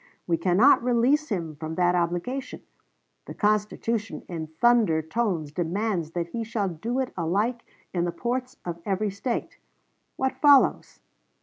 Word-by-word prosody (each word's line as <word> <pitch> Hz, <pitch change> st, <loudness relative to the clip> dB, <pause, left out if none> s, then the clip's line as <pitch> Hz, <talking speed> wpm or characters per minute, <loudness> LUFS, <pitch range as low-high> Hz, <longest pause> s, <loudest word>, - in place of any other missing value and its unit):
We 170 Hz, -, +2 dB
cannot 195 Hz, +11 st, +4 dB
release 250 Hz, +5 st, +2 dB
him 170 Hz, -7 st, -3 dB
from 160 Hz, +1 st, -5 dB
that 175 Hz, 0 st, +3 dB
obligation. 175 Hz, +10 st, -2 dB, 0.6 s
The -, -, -8 dB
Constitution 210 Hz, +1 st, -1 dB
in 165 Hz, -3 st, -5 dB
thunder 170 Hz, -1 st, +3 dB
tones 165 Hz, -4 st, -1 dB
demands 175 Hz, 0 st, -2 dB
that 170 Hz, -1 st, -2 dB
he 230 Hz, +5 st, -3 dB
shall 220 Hz, -3 st, -2 dB
do 220 Hz, +10 st, -4 dB
it 265 Hz, -1 st, -2 dB
alike 205 Hz, +8 st, 0 dB, 0.3 s
in 175 Hz, -1 st, 0 dB
the 175 Hz, -, -1 dB
ports 250 Hz, +5 st, -3 dB
of 170 Hz, -1 st, -5 dB
every 200 Hz, +2 st, -1 dB
State. 215 Hz, +5 st, -4 dB, 0.6 s
What 265 Hz, 0 st, -2 dB
follows? 285 Hz, -2 st, +4 dB
200 Hz, 140 wpm, -26 LUFS, 170-235 Hz, 0.6 s, cannot